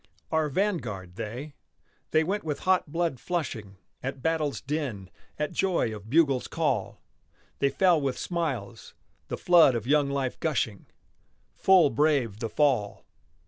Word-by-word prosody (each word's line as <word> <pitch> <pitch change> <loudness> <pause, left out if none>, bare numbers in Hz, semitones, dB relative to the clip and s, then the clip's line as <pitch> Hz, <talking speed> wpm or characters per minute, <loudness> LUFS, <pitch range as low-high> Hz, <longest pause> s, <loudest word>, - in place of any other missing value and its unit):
Our 160 -1 +1
vanguard, 120 - -2
they. 125 +10 -6 0.6
They 155 0 +3
went 200 +5 -2
with 150 -3 -3
hot 185 -5 +1
blood 165 -5 -1
flushing 115 - -4 0.2
At 135 0 -5
battle's 155 -6 0
din, 130 - -4 0.3
at 150 -1 -2
joy 175 - 0
of 105 +1 -11
bugle's 140 -3 +3
call. - - -1 0.6
They 140 - +3
fell 175 -1 +3
with 135 -2 -1
smiles, 130 - -4 0.3
the - - -4
flood 170 -7 +5
of 115 -2 -3
young 145 +1 +3
life 135 -2 -2
gushing, 120 - -1 0.7
Full 185 -6 +5
brave 130 -6 +1
the 115 - -3
fall! 130 -9 +1
140 Hz, 140 wpm, -27 LUFS, 115-160 Hz, 0.7 s, flood